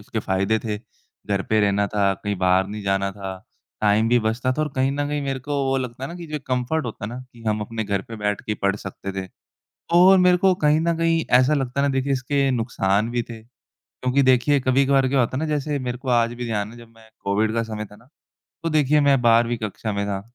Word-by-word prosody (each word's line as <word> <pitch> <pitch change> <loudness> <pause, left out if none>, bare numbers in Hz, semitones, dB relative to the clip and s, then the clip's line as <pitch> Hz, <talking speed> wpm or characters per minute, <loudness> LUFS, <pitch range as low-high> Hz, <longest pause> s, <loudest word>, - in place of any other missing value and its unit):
उसके 110 +2 -5
फ़ायदे 100 +2 0
थे, 105 -2 -2
घर 100 -3 -6
पे 110 0 +4
रहना 100 0 +2
था, 100 -1 +1
कहीं 100 +2 -4
बाहर 95 +1 +3
नहीं 105 +1 -6
जाना 100 0 0
था, 95 -1 -6 0.4
टाइम 105 +1 +3
भी 120 +1 +4
बचता 115 +3 0
था 155 - -1
और 155 - -1
कहीं 130 +1 +2
न 145 0 -1
कहीं 145 0 -2
मेरे 135 -1 -2
को 145 +3 -4
वो 135 0 +1
लगता 125 0 -6
है - - -4
ना - - -7
कि 170 -1 -8
जो 150 - -1
कम्फर्ट 130 +5 -1
होता 110 -2 -6
है - - -3
ना 120 +2 -6
कि 115 -1 -15
हम 105 0 0
अपने 110 +1 -4
घर 100 -1 -1
पे 115 - -7
बैठ 105 -1 -1
के - - +1
पढ़ 100 0 +2
सकते 100 -1 -7
थे 95 - -10 0.7
और 185 +2 +7
मेरे 180 0 +5
को 190 +1 +4
कहीं 150 +1 +4
न 170 +1 +1
कहीं 165 -1 +2
ऐसा 130 +4 +3
लगता 135 -1 -1
है 140 - +2
ना 140 - 0
देखिए 135 +1 0
इसके 135 +1 0
नुकसान 110 -3 0
भी 120 0 0
थे, 115 -1 -10 0.4
क्योंकि 130 +2 -1
देखिए 130 +2 +4
कभी-कभार 135 +1 +3
क्या 135 0 +1
होता 125 +1 +1
है - - -1
ना, 160 - -1
जैसे 150 0 -1
मेरे 125 -1 -4
को 130 +1 -6
आज 120 -1 +2
भी 120 0 -5
ध्यान 105 -2 -2
है 120 - -13
जब 120 - -13
मैं 110 0 -18 0.2
कोविड 105 +2 +1
का 115 0 0
समय 110 -1 -5
था 105 - -15
ना, 120 - -21 0.6
तो 165 - -1
देखिए 150 -1 +3
मैं 140 -2 +4
12वीं 120 0 +4
कक्षा 110 0 -4
में 100 0 -1
था, 100 -1 -2
120 Hz, 250 wpm, -23 LUFS, 105-135 Hz, 0.7 s, और